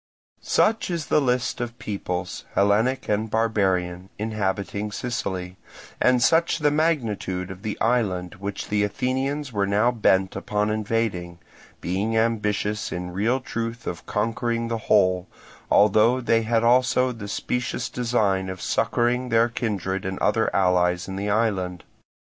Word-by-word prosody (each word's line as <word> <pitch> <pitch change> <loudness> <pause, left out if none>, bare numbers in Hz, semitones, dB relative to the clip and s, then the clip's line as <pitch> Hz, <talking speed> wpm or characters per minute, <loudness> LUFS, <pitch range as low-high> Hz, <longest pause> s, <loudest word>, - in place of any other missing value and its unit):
Such 220 -1 +2
is 170 -4 -2
the 150 - +5
list 125 -2 0
of 120 - -1
the 115 - -26
peoples, 90 -5 -4
Hellenic 110 +6 +2
and 105 +1 0
barbarian, 95 -5 0
inhabiting 105 -1 -2
Sicily, 95 -6 -4 0.4
and 125 -1 +4
such 165 +3 +3
the 150 -2 +2
magnitude 115 - -1
of 95 0 -10
the 110 -1 -4
island 100 -7 0
which 100 0 -5
the 105 0 +2
Athenians 130 +5 -2
were 100 -1 +1
now 105 +5 +3
bent 95 -5 +2
upon 105 +2 -1
invading; 105 -5 -2 0.4
being 100 +6 -1
ambitious 105 -2 0
in 90 0 -4
real 110 +8 +1
truth 115 -2 -5
of 85 - -6
conquering 115 +2 -1
the 115 -1 -2
whole, 95 -3 +3 0.4
although 110 +4 +4
they 115 -2 +2
had 115 0 +1
also 125 +1 +3
the 110 -4 -7
specious 125 +3 -2
design 105 -6 0
of 95 0 -6
succouring 125 +5 0
their 115 +1 +3
kindred 95 -5 -2
and 95 0 -3
other 110 +1 +2
allies 90 -2 +2
in 95 - -5
the 100 +2 -2
island. 95 -5 0
105 Hz, 140 wpm, -24 LUFS, 95-120 Hz, 0.4 s, the